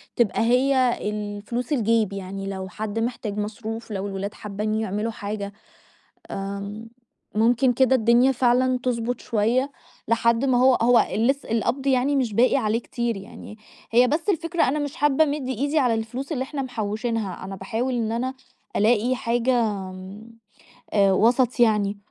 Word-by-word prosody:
تبقى 235 -3 +1
هي 255 +1 +3
الفلوس 210 +5 -4
الجيب، 225 -5 +2
يعني 195 0 -6
لو 190 -1 -5
حد 215 +3 -4
محتاج 225 -3 -3
مصروف، 220 +2 -5
لو 200 -1 -3
الولاد 200 +1 -4
حابين 210 +1 -4
يعملوا 220 +1 -2
حاجة، 205 -1 -5 0.8
آمم 200 +3 -6 0.5
ممكن 240 +4 +3
كده 260 +1 +4
الدنيا 240 +2 +4
فعلًا 255 0 +2
تضبُط 245 -1 -1
شوية، 235 +5 +1 0.4
لحد 230 +2 +2
ما 260 -2 +3
هو 255 +1 +5
هو 240 +1 +5
لسّ 270 +6 +1
القبض 235 +5 -1
يعني 265 +2 +2
مش 250 -6 0
باقي 245 +6 +4
عليه 220 -3 +1
كتير 235 -2 -3
يعني، 200 +2 -11 0.3
هي 245 +2 +5
بس 315 +8 -1
الفكرة 340 -2 +1
أنا 280 +4 +1
مش 290 -2 -4
حابة 295 +1 +3
أمد 290 -3 -2
إيدي 285 +5 0
على 250 -4 +2
الفلوس 225 +6 -4
اللي 260 -4 -1
إحنا 275 +1 -4
محوشينها، 220 -5 -3
أنا 195 +1 -6
باحاول 225 +7 -2
إن 225 -2 -1
أنا 255 +3 -2 0.4
ألاقي 235 +4 +3
حاجة 240 +1 +1
آمم، 195 +1 -5 0.6
آآ، 200 -2 +4
وسط 245 +5 +2
يعني، 210 -3 +3
230 Hz, 150 wpm, -24 LUFS, 210-255 Hz, 0.8 s, هو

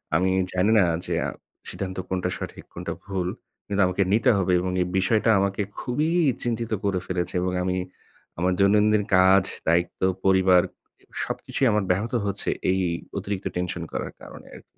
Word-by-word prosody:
আমি 95 +1 +2 0.2
জানি 95 +4 +2
না 95 - +5 0.2
যে, - - -1
আ - - -2 0.4
সিদ্ধান্ত 95 -1 -5
কোনটা 90 -1 -1
সঠিক? - - -7
কোনটা - - -5
ভুল? 95 -3 -2 0.4
কিন্তু 100 0 0
আমাকে 90 +2 +1
নিতে 115 +4 +3
হবে 95 -1 +1
এবং 90 +1 -2
এই 90 - 0
বিষয়টা 110 +4 +2
আমাকে 100 +1 0 0.2
খুবই 150 +6 -1 0.3
চিন্তিত 115 -1 -2
করে 100 -2 0
ফেলেছে। 90 -1 -2
এবং 90 0 0
আমি 90 0 -1 0.6
আমার 90 +2 +1
দৈনন্দিন 105 +1 +4
কাজ, 95 +1 +6 0.2
দায়িত্ব, 85 +2 +1 0.2
পরিবার, 95 -1 +5 0.6
সবকিছুই 135 - -1
আমার 105 -1 +1
ব্যাহত 105 +6 -1
হচ্ছে 100 -1 -1 0.2
এই 95 - +1 0.4
অতিরিক্ত 100 -1 -4
tension 90 -1 -2
করার - - -3
কারণে - - -12
আরকি। - - -13
95 Hz, 160 wpm, -25 LUFS, 90-105 Hz, 0.6 s, কাজ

